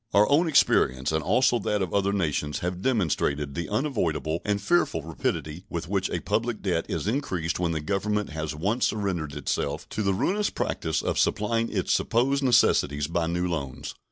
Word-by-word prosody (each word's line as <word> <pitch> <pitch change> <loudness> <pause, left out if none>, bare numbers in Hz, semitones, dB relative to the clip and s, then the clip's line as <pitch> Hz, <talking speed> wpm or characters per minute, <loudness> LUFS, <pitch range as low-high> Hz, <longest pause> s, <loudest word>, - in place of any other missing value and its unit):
Our 105 +1 +6
own 160 +5 +4
experience 65 - +3
and 80 0 0
also 120 - +3
that 105 -1 0
of 90 - -5
other 100 0 +2
nations 75 -6 -1
have 90 0 -3
demonstrated 75 - 0
the 85 +4 -4
unavoidable 95 - -1
and 105 -1 0
fearful 105 - +1
rapidity 80 +1 -3
with 85 -1 -4
which 95 0 0
a - - -2
public - - -1
debt - - 0
is - - -2
increased 90 - -1
when 85 -2 0
the 80 -2 -2
Government 100 +4 -1
has 80 -1 -4
once 100 +10 +1
surrendered 90 -9 -2
itself - - -2
to 110 - -3
the 100 -2 +1
ruinous 205 - +1
practice - - -2
of - - 0
supplying 115 +2 +1
its - - 0
supposed 135 +4 +1
necessities 75 - +3
by 85 +1 -1
new 90 +2 -1
loans. 70 -7 -4
95 Hz, 180 wpm, -26 LUFS, 80-110 Hz, -, Our